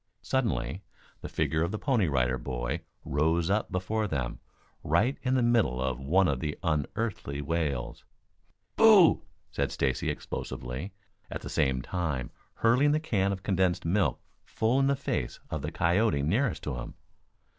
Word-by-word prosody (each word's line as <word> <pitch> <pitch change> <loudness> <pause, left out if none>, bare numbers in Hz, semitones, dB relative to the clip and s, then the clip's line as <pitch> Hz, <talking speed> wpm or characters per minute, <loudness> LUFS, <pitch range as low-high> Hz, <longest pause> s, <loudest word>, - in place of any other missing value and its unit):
Suddenly 100 - -1 0.4
the - - -6
figure 80 0 0
of 85 - +1
the 105 - -2
Pony 115 - +1
Rider 65 -3 +1
Boy 60 +5 -3 0.2
rose 80 +5 +1
up 105 +1 0
before 105 +4 -1
them, 70 -8 -3 0.4
right 95 - +2
in 130 0 +1
the 125 - +3
middle 115 - +2
of 65 -1 -1
one 90 +8 +3
of 70 -5 0
the 75 +1 -3
unearthly 80 -1 -2
wails. 70 -5 -2 0.7
"Boo!" 210 -7 +7 0.3
said - - -1
Stacy 65 -2 0
explosively, 65 +10 -5 0.4
at - - -5
the - - -7
same 65 -1 +1
time 75 -9 -2 0.2
hurling 130 +6 +3
the 155 - +2
can 100 -11 0
of 95 0 -5
condensed 95 -3 +1
milk 90 +1 +1 0.2
full 115 +4 +1
in 135 - +3
the 140 - +3
face 140 - -3
of 80 - -2
the 75 +3 -4
coyote 85 -2 +2
nearest 100 - 0
to 60 - -3
him. - - -7
85 Hz, 155 wpm, -29 LUFS, 70-110 Hz, 0.7 s, Boo